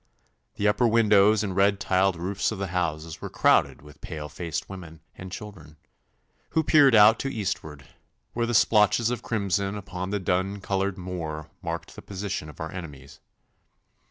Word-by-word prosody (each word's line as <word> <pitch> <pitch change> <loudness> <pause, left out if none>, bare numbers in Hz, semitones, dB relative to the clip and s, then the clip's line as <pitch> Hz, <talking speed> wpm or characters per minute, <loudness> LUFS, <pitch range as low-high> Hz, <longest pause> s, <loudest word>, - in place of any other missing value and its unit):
The 105 - 0
upper 120 +4 +3
windows 110 -2 +4
and 95 -3 -3
red 100 +1 +3
tiled 95 -1 +2
roofs 95 +6 -2
of 110 - -4
the 100 -1 -4
houses 80 -3 -3
were - - -5
crowded - - +2
with 75 -1 -16
pale 75 -2 -6
faced 80 +1 -5
women 85 -5 -10
and 95 0 -10
children, 90 -6 -10 0.8
who 160 - +4
peered 140 -5 +5
out 110 +1 +7
to 135 - -2
eastward, 75 - -4 0.5
where 120 0 -1
the 120 - -1
splotches 110 +2 +4
of 125 - -3
crimson 100 -2 -1
upon 95 -2 -6
the 105 +1 -1
dun 95 +2 -1
coloured 95 0 -2
moor 85 -4 -6
marked - - -5
the - - -9
position 95 -5 -5
of 75 - -14
our 80 +2 -5
enemies. 75 -7 -9
95 Hz, 165 wpm, -26 LUFS, 85-105 Hz, 0.8 s, out